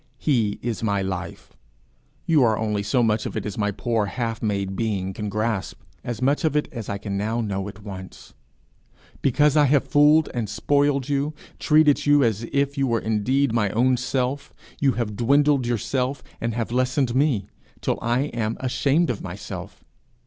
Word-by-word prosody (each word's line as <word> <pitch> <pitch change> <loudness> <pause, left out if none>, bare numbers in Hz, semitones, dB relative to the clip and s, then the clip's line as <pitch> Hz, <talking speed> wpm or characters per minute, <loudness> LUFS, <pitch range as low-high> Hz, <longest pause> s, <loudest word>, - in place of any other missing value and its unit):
He 115 -8 +1
is 120 -2 -3
my 100 -3 0
life; 95 -2 -6 0.7
you 155 -5 +4
are 110 -2 +3
only 105 -2 -1
so 120 +4 +1
much 110 -1 +1
of - - -5
it - - -3
as 105 - -4
my 105 -1 0
poor 110 +1 -1
half 115 +1 -3
made 100 -3 -1
being 95 -3 -2
can 105 +1 -4
grasp 105 -1 -2 0.2
as 120 0 -4
much 140 +6 +2
of 155 -2 +1
it 150 - +1
as 115 -7 -6
I 100 - -2
can 100 -1 -4
now 110 +4 -1
know 100 -3 -2
at 100 +1 -13
once. 95 -2 -10 0.9
Because 145 +3 +3
I 150 -1 +5
have 140 0 +3
fooled 150 +2 +5
and 115 -4 -2
spoiled 140 +3 +1
you, 145 +1 -1 0.2
treated 150 -1 +4
you 145 -1 +5
as 115 -1 0
if 140 0 0
you 135 - +2
were 115 -2 +1
indeed 115 +5 +1
my 110 -3 +2
own 125 +5 +2
self, 130 +2 -2 0.3
you 135 -2 +3
have 110 -3 -3
dwindled 140 +2 +3
yourself 125 +3 -1 0.2
and 115 -1 -2
have 115 -1 -2
lessened 130 0 +1
me, 130 -7 +2 0.3
till - - -1
I 120 +2 +1
am 115 -1 -2
ashamed 140 +5 +1
of 110 - -5
myself. - - -8
120 Hz, 180 wpm, -23 LUFS, 105-140 Hz, 0.9 s, I